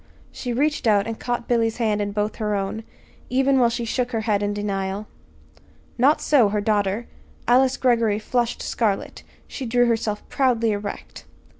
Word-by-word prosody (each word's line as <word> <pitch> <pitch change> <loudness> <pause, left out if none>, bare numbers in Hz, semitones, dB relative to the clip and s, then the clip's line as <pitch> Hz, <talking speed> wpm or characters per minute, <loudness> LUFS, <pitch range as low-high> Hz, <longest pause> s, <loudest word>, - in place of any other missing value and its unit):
she 250 - -5
reached 285 +1 0
out 205 -2 +4
and 225 -1 -5
caught 240 -1 -3
Billy's 230 -2 +1
hand 215 -3 0
in 205 0 -2
both 210 +1 -2
her 210 -2 -1
own 200 +3 -3 0.5
even 270 +1 +3
while 240 -2 +4
she 235 0 -3
shook 245 +2 -1
her 225 - 0
head 210 -2 0
in 205 0 0
denial. 200 0 -3 0.9
Not 270 +5 +4
so 255 -8 +4
her 210 +1 0
daughter. 205 +1 0 0.4
Alice 255 +2 +4
Greggory 230 -5 +2
flushed 240 +2 -1
scarlet. 210 -4 -1 0.3
She 265 - -6
drew 245 +1 +3
herself 225 -3 -1
proudly 235 -4 +1
erect. 205 0 -6
225 Hz, 165 wpm, -23 LUFS, 205-245 Hz, 0.9 s, out